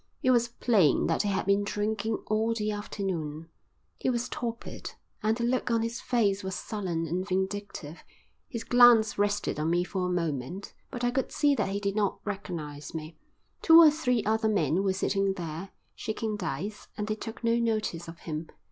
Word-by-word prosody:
It 255 Hz, -, +5 dB
was 240 Hz, -1 st, +4 dB
plain 220 Hz, -, +3 dB
that -, -, +2 dB
he 205 Hz, -, -1 dB
had 195 Hz, -1 st, 0 dB
been 200 Hz, +1 st, +3 dB
drinking 215 Hz, +2 st, -1 dB
all 220 Hz, +2 st, +1 dB
the 215 Hz, -1 st, -1 dB
afternoon. 170 Hz, -7 st, -4 dB, 0.5 s
He -, -, 0 dB
was 245 Hz, 0 st, -1 dB
torpid, 235 Hz, -1 st, -5 dB, 0.3 s
and 220 Hz, +1 st, +1 dB
the 235 Hz, -, -2 dB
look 250 Hz, +1 st, +1 dB
on 230 Hz, -1 st, +2 dB
his 230 Hz, +1 st, -3 dB
face 205 Hz, -5 st, +1 dB
was 190 Hz, 0 st, -3 dB
sullen 185 Hz, -8 st, -3 dB
and 180 Hz, +4 st, -2 dB
vindictive. 190 Hz, -4 st, -3 dB, 0.5 s
His 230 Hz, -7 st, -4 dB
glance 235 Hz, -4 st, +6 dB
rested 205 Hz, -6 st, 0 dB
on 155 Hz, +1 st, 0 dB
me 175 Hz, +1 st, +2 dB
for 185 Hz, 0 st, -2 dB
a -, -, -1 dB
moment, 170 Hz, +1 st, -3 dB, 0.2 s
but 245 Hz, -, -6 dB
I 245 Hz, -, +2 dB
could 265 Hz, +1 st, -1 dB
see 290 Hz, -1 st, +3 dB
that 270 Hz, -, 0 dB
he 200 Hz, +1 st, -1 dB
did 200 Hz, -1 st, -1 dB
not 205 Hz, -3 st, +1 dB
recognise 165 Hz, -8 st, -5 dB
me. 155 Hz, 0 st, -6 dB, 0.5 s
Two 325 Hz, -1 st, +8 dB
or 320 Hz, -2 st, +9 dB
three 250 Hz, -7 st, 0 dB
other 220 Hz, +1 st, +1 dB
men 180 Hz, -3 st, +2 dB
were 195 Hz, -1 st, +2 dB
sitting 195 Hz, 0 st, +1 dB
there, 170 Hz, +2 st, -5 dB, 0.2 s
shaking 220 Hz, 0 st, -3 dB
dice, 195 Hz, +2 st, -4 dB
and 210 Hz, -, -2 dB
they 215 Hz, -, -1 dB
took 225 Hz, +2 st, -7 dB
no 230 Hz, 0 st, +3 dB
notice 215 Hz, -7 st, -1 dB
of 165 Hz, +1 st, -10 dB
him. 155 Hz, 0 st, -5 dB
205 Hz, 190 wpm, -29 LUFS, 180-230 Hz, 0.5 s, or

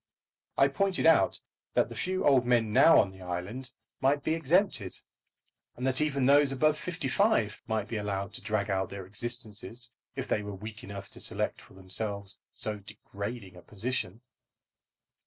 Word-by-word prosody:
I 135 Hz, -, +6 dB
pointed 185 Hz, +7 st, +1 dB
out 165 Hz, 0 st, +5 dB, 0.4 s
that -, -, +4 dB
the -, -, -8 dB
few 185 Hz, +1 st, -1 dB
old 135 Hz, -3 st, +5 dB
men 120 Hz, -3 st, +2 dB
now 165 Hz, -, +7 dB
on 95 Hz, -, +2 dB
the 95 Hz, 0 st, -14 dB
island 95 Hz, +9 st, -5 dB, 0.3 s
might 140 Hz, +2 st, +2 dB
be 155 Hz, -, +1 dB
exempted, 165 Hz, -, +1 dB, 0.8 s
and 125 Hz, -, -4 dB
that 130 Hz, +2 st, +1 dB
even 140 Hz, -3 st, +1 dB
those 140 Hz, +1 st, +5 dB
above 150 Hz, +3 st, +3 dB
fifty 170 Hz, -5 st, -3 dB
five 130 Hz, -, +2 dB
might 110 Hz, -3 st, -1 dB
be 115 Hz, -, -3 dB
allowed 100 Hz, -2 st, -3 dB
to -, -, -7 dB
drag 105 Hz, -1 st, -1 dB
out 95 Hz, 0 st, 0 dB
their 100 Hz, -1 st, -7 dB
existences 115 Hz, +2 st, -3 dB, 0.2 s
if -, -, -4 dB
they 105 Hz, -, +1 dB
were 105 Hz, -1 st, -6 dB
weak 110 Hz, +3 st, -8 dB
enough 100 Hz, 0 st, -8 dB
to -, -, -12 dB
select -, -, -1 dB
for -, -, -18 dB
themselves 100 Hz, +1 st, -4 dB
so 105 Hz, -1 st, -3 dB
degrading 100 Hz, 0 st, -7 dB
a 90 Hz, -, -12 dB
position. 110 Hz, 0 st, -3 dB
110 Hz, 170 wpm, -30 LUFS, 100-135 Hz, 0.8 s, now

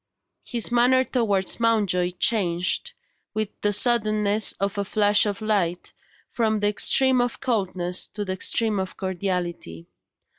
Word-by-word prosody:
His 235 Hz, -1 st, 0 dB
manner 250 Hz, +2 st, +3 dB
towards 210 Hz, -8 st, -1 dB
Mountjoy 200 Hz, -6 st, 0 dB
changed, 180 Hz, -4 st, 0 dB, 0.4 s
with 215 Hz, -1 st, -2 dB
the 205 Hz, -, +1 dB
suddenness 215 Hz, -2 st, +2 dB
of 200 Hz, +1 st, -3 dB
a -, -, 0 dB
flash 205 Hz, +1 st, +2 dB
of 205 Hz, +1 st, -4 dB
light, 185 Hz, -5 st, -2 dB, 0.4 s
from 220 Hz, -2 st, 0 dB
the 205 Hz, -, 0 dB
extreme 260 Hz, +4 st, +3 dB
of 245 Hz, -1 st, -3 dB
coldness 185 Hz, -8 st, -1 dB
to 205 Hz, 0 st, -6 dB
the 185 Hz, -, -3 dB
extreme 215 Hz, +2 st, +1 dB
of 190 Hz, 0 st, -5 dB
cordiality. 175 Hz, -, -4 dB
205 Hz, 135 wpm, -23 LUFS, 185-225 Hz, 0.4 s, manner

